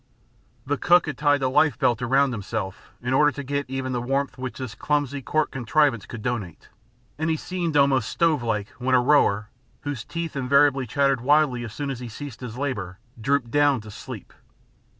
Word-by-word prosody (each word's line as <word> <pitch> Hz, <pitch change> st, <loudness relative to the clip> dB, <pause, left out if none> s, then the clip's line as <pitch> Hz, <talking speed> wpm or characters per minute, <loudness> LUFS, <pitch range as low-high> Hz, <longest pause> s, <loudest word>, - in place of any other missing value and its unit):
The 145 Hz, +1 st, -1 dB
cook 175 Hz, 0 st, +5 dB
had 150 Hz, -4 st, -4 dB
tied 145 Hz, 0 st, +2 dB
a -, -, +3 dB
life 145 Hz, +3 st, +3 dB
belt 125 Hz, -3 st, +1 dB
around 135 Hz, +2 st, +3 dB
himself 105 Hz, -3 st, -5 dB
in 125 Hz, +1 st, -1 dB
order 150 Hz, +2 st, +5 dB
to 140 Hz, -, -6 dB
get 140 Hz, 0 st, -3 dB
even 130 Hz, -1 st, -3 dB
the 125 Hz, -1 st, -1 dB
warmth 135 Hz, +3 st, -1 dB
which 130 Hz, -1 st, -6 dB
this 130 Hz, -4 st, -5 dB
clumsy 145 Hz, +3 st, -1 dB
cork 155 Hz, +3 st, 0 dB
contrivance 130 Hz, -2 st, +1 dB
could 115 Hz, -3 st, -8 dB
donate, 110 Hz, -9 st, -4 dB, 0.5 s
and 160 Hz, +1 st, 0 dB
he 160 Hz, -, +2 dB
seemed 170 Hz, -1 st, -2 dB
almost 135 Hz, -5 st, +3 dB
stove 165 Hz, -5 st, +2 dB
like 110 Hz, -3 st, -2 dB
when 130 Hz, +1 st, +2 dB
a -, -, +6 dB
rower, 120 Hz, -6 st, +3 dB, 0.3 s
whose 145 Hz, -6 st, -4 dB
teeth 165 Hz, -2 st, -5 dB
invariably 135 Hz, 0 st, +3 dB
chattered 135 Hz, 0 st, +1 dB
wildly 140 Hz, -2 st, +3 dB
as 115 Hz, -2 st, -7 dB
soon 145 Hz, -2 st, -3 dB
as 130 Hz, -, -5 dB
he 125 Hz, -1 st, -7 dB
ceased 135 Hz, +2 st, -8 dB
his 120 Hz, -2 st, -7 dB
labor, 100 Hz, -10 st, -3 dB, 0.2 s
dropped 135 Hz, -1 st, 0 dB
down 145 Hz, -2 st, +3 dB
to 110 Hz, 0 st, -11 dB
sleep. -, -, -9 dB
135 Hz, 190 wpm, -24 LUFS, 120-145 Hz, 0.5 s, a